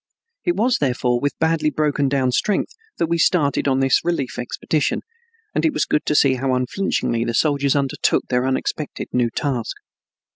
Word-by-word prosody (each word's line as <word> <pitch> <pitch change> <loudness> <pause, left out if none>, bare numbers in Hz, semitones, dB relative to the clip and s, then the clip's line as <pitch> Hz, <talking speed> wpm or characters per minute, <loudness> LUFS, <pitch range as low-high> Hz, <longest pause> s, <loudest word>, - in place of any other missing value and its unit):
It 350 - +1
was, 240 +3 +2
therefore, 125 -3 +1
with 145 +2 -2
badly 160 -1 +1
broken 145 -1 0
down 130 -2 +1
strength 205 - 0 0.2
that - - +1
we 170 +1 -1
started 150 -5 +2
on 135 -1 +2
this 135 -2 +3
relief 165 -7 -2
expedition, 145 +4 -1 0.5
and - - 0
it 315 - +2
was - - +1
good 150 - 0
to 150 - +1
see 140 -2 +5
how 130 0 0
unflinchingly 125 -3 -1
the 115 0 -2
soldiers 140 -2 +2
undertook 140 -2 +1
their 125 +1 0
unexpected 135 +3 -3
new 125 -1 +2
task. 125 -1 -2
140 Hz, 175 wpm, -21 LUFS, 130-155 Hz, 0.5 s, see